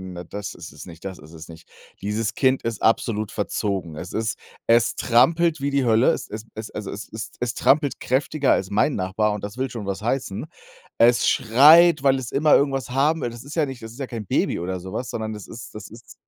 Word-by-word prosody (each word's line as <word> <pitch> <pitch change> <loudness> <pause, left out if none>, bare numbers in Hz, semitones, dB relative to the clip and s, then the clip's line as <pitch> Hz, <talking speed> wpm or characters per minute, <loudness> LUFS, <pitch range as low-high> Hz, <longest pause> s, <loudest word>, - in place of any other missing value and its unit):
dann 90 -1 -8
das 105 0 -6
ist - - -10
es - - -11
nicht, 85 0 -13
das 95 -2 -6
ist 75 +2 -15
es 80 -1 -10
nicht. 80 -1 -14 0.3
Dieses 105 +3 -2
Kind 130 +1 +2
ist 115 -1 -3
absolut 110 -2 +1
verzogen. 100 -5 -3
Es 90 +4 -7
ist 110 0 -2 0.3
es 115 +1 +3
trampelt 155 +6 +3
wie 140 - 0
die 140 -2 +1
Hölle. 115 +2 +4
Es - - -1
es 110 +1 -7
es 110 0 -7
also, 105 -2 -6
es 100 - -7
es 110 +1 -5
es 120 -3 -2
trampelt 145 0 +2
kräftiger 135 +2 +1
als 95 - -2
mein 110 +8 +2
Nachbar 105 +3 0
und 105 - -6
das 105 +3 -6
will 130 0 -1
schon 115 -5 -6
was 100 0 -4
heißen. 115 -3 -2 0.5
Es 120 +1 +4
schreit, 150 +7 +6
weil 135 -1 +3
es 125 -3 -6
immer 150 +2 +4
irgendwas 135 -4 +1
haben 145 +5 +1
will 120 - -1
das 120 0 -10
ist 145 +2 -9
ja 160 -3 +2
nicht 130 -2 -8
das 110 - -8
ist 120 - -14
ja 135 - -3
kein 115 -4 -6
Baby - - 0
oder 90 +2 -3
so 95 +2 -9
was, 125 +3 -4
sondern 110 -1 -4
das 105 -2 -8
ist 115 -3 -10
das 105 -1 -8
ist 115 +2 -14
115 Hz, 235 wpm, -23 LUFS, 105-135 Hz, 0.5 s, schreit